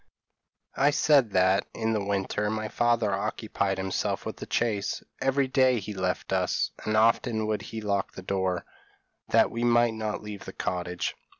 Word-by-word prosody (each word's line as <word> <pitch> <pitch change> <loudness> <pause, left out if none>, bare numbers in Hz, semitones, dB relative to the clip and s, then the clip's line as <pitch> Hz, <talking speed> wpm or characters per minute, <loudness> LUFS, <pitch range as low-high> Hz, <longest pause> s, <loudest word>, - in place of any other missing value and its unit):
p> - - -4
"I 140 - +6
said 145 -4 +4
that, 95 +2 +3
in 110 0 0
the 105 -2 0
winter, 100 +1 -1
my 110 0 -3
father 120 -3 +1
occupied 100 -1 -1
himself 95 0 -2
with - - -5
the - - -8
chase; 105 -4 -1 0.2
every 135 0 +2
day 130 -2 +3
he 105 +1 -6
left 95 -2 -2
us, - - +1
and 110 0 0
often 110 0 +3
would 110 -1 -1
he 110 - -6
lock 100 -2 -1
the 95 - -9
door, 95 -2 -1 0.6
that - - +4
we 115 +1 -3
might 120 -1 +4
not 110 -1 -3
leave 105 -2 -8
the - - -8
cottage. 90 -1 -3
105 Hz, 175 wpm, -27 LUFS, 95-120 Hz, 0.6 s, I